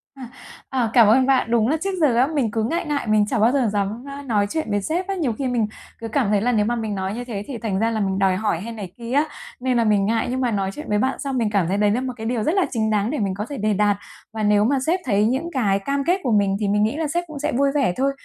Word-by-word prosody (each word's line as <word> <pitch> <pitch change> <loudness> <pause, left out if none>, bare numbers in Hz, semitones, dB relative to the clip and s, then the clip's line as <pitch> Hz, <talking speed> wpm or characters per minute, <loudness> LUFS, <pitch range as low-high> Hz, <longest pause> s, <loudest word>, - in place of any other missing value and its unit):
À, 255 -3 -9 0.4
ờ, 250 -4 0
cảm 230 -4 +7
ơn 255 +4 +5
bạn. 260 -3 +2
Đúng 230 -1 +3
là 310 - +1
trước 390 - -1
giờ 280 -7 +4
á, 250 +3 +4
mình 280 -8 -1
cứ 220 +1 -1
ngại 330 +11 -1
ngại 290 -6 -2
mình 215 -1 +3
chả 215 - -1
bao 225 +3 +4
giờ 255 -5 +1
dám, 205 +4 -2
a, 280 0 -7
nói 215 -7 +1
chuyện 315 -7 -2
với 205 0 +1
sếp 350 - -2
á, 390 - -2
nhiều 290 -11 -1
khi 260 +3 -3
mình 235 -4 0 0.3
cứ 225 - -5
cảm 230 -2 0
thấy 205 -1 +2
là 245 - +1
nếu 210 -3 +2
mà 240 +2 0
mình 220 -3 -3
nói 190 +1 -3
như 245 +2 -4
thế 205 -4 -5
thì 260 -4 -5
thành 210 -4 -2
ra 225 +1 +1
là 220 - -1
mình 195 -1 -1
đòi 190 -1 +3
hỏi 190 -5 -1
hay 230 +2 -6
này 195 -5 -7
kia 235 0 -7
á, 290 +3 +3 0.3
nên 255 -1 0
là 235 - +3
mình 205 -2 +2
ngại, 225 +1 0
nhưng 260 +1 -2
mà 245 - +1
nói 195 -2 -1
chuyện 300 - -8
với 210 - +2
bạn 260 +5 0
xong 275 -3 -3
mình 225 -3 +1
cảm 195 -5 +1
thấy 195 - 0
đấy 205 0 +3
là 245 - 0
một 260 -1 -3
cái 220 - -6
điều 230 -2 -1
rất 315 - +1
là 385 - +3
chính 220 -4 0
đáng 210 +1 +1
để 300 - -2
mình 195 -2 -1
có 205 +3 -4
thể 285 - -5
đề 215 0 +1
đạt. 205 0 +2 0.4
Và 220 -1 -3
nếu 210 0 +3
mà 275 +4 +2
sếp 360 +3 +2
thấy 210 -3 +2
những 270 +8 -1
cái 205 -9 +1
cam 275 +6 -2
kết 360 +5 +1
của 245 - 0
mình 200 -2 +2
thì 205 - -1
mình 210 +1 +2
nghĩ 220 +7 0
là 320 -2 -1
sếp 345 +4 -1
cũng 310 -3 -8
sẽ 295 - -1
vui 275 +2 +2
vẻ 265 -11 +2
thôi. 275 +1 +2
230 Hz, 325 wpm, -22 LUFS, 210-270 Hz, 0.4 s, cảm